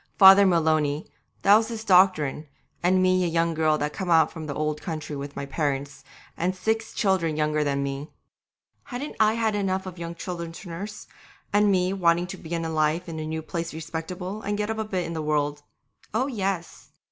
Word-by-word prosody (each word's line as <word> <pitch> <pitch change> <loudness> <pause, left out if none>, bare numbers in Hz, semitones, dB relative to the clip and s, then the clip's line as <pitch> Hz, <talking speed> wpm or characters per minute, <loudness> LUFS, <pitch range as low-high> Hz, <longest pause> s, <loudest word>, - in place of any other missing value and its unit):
Father 195 +1 +9
Maloney, 155 -4 +2 0.4
that 200 - +7
was 220 0 0
his 225 -2 -5
doctrine, 180 -7 +3 0.3
and 185 +1 +3
me 185 0 +3
a - - +1
young 165 0 +1
girl 155 -1 +2
just 150 0 -2
come 190 -2 -4
out 160 -2 +5
from 160 -2 -7
the 145 - -3
old 150 0 -2
country 155 -3 -5
with 140 0 -6
my 140 - -4
parents, 140 -1 -3 0.3
and 180 +2 -1
six 220 +3 -1
children 185 -6 +1
younger 150 0 +1
than 140 -1 0
me. 140 +2 -4 0.8
Hadn't 275 +3 -6
I 215 0 +4
had 225 -2 +1
enough 190 -2 -1
of 180 -2 -8
young 170 0 -5
children 170 -1 -5
to 175 +2 -10
nurse, 195 +5 -7 0.5
and 205 0 +4
me 185 0 +2
wanting 175 -2 +2
to 180 - -7
begin 165 0 -4
life 155 +2 +1
in 160 -1 -5
a 155 - -4
new 160 0 -3
place 165 -1 -4
respectable, 180 +5 -5
and 205 0 -2
get 210 +1 -1
up 220 - -4
a 220 - -1
bit 185 -4 -2
in 165 - -5
the 160 - -3
world? 150 -1 0 0.5
Oh, 250 +4 +2
yes! 195 -9 -3
170 Hz, 200 wpm, -25 LUFS, 155-195 Hz, 0.8 s, Father